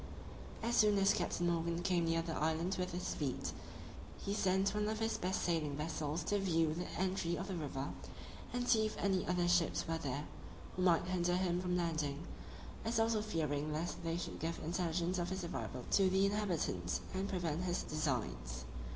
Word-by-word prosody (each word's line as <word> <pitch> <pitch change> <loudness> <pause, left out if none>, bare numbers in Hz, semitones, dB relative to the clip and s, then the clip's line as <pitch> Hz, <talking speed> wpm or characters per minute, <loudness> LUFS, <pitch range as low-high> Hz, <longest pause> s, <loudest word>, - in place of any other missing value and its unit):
As 235 +1 +1
soon 210 -2 +6
as 195 0 +5
Captain 175 0 0
Morgan 170 0 0
came 175 -3 +2
near 165 0 +2
the 165 -1 -3
island 160 +4 +1
with 180 0 -1
his 180 +1 -2
fleet, 140 -4 -2 0.7
he 200 - -3
sent 195 0 +2
one 210 0 +1
of 220 - -1
his 225 0 0
best 185 +1 -1
sailing 155 -5 0
vessels 155 +1 -2
to 205 - +1
view 165 -5 +2
the 175 +2 -4
entry 185 -2 +1
of 190 - -4
the 195 - -3
river, 140 -4 -3 0.6
and 245 0 -1
see 220 -2 +5
if 215 - -6
any 190 -2 +1
other 180 -1 +2
ships 175 -1 +3
were 165 0 -1
there, 145 -1 -2 0.5
who 185 - -2
might 175 -2 +4
hinder 180 -1 +1
him 180 -1 +1
from 180 -1 0
landing; 155 -3 -1 0.6
as 225 0 +1
also 225 -1 +3
fearing 155 -7 -1
lest 165 +3 -3
they 165 0 0
should 175 - -4
give 165 +1 -2
intelligence 175 +1 0
of 175 - -1
his 190 -1 -3
arrival 130 -6 -4
to 195 -2 +5
the 190 +1 +4
inhabitants, 180 - 0
and 190 +1 -1
prevent 175 -2 -1
his 175 0 0
designs. 65 - -2
175 Hz, 185 wpm, -36 LUFS, 160-190 Hz, 0.7 s, soon